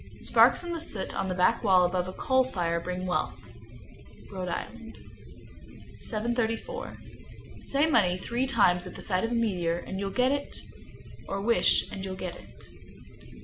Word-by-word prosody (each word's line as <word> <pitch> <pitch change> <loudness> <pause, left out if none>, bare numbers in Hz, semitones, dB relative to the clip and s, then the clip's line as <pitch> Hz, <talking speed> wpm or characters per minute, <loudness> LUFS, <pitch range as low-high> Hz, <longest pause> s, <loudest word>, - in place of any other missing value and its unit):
Sparks - - +4
in 345 - -4
the 330 - -3
soot 220 -11 -1
on 195 - -1
the 185 - -2
back 185 +7 +2
wall 185 -4 +5
above 180 0 -1
a 185 - -6
coal 260 +2 +2
fire 175 -9 -1
bring 180 +2 -4
wealth. 180 - -1 0.9
Rhode 185 -2 -4
Island. 225 +6 -6 1.0
734. 225 0 -2 0.6
Say 280 +2 +1
"Money" 205 - +3
three 240 +7 -2
times 180 -8 +3
at - - -9
sight 185 -2 -1
of 225 - 0
a 240 - -1
meteor, 180 -7 0
and 190 +2 -6
you'll 200 0 -2
get 250 +5 +2
it, 285 0 -3 0.7
or 195 - -2
wish 230 +4 +3
and 190 - -6
you'll 190 -1 -4
get 180 -2 -5
it. - - -12
195 Hz, 160 wpm, -28 LUFS, 180-235 Hz, 1.0 s, wall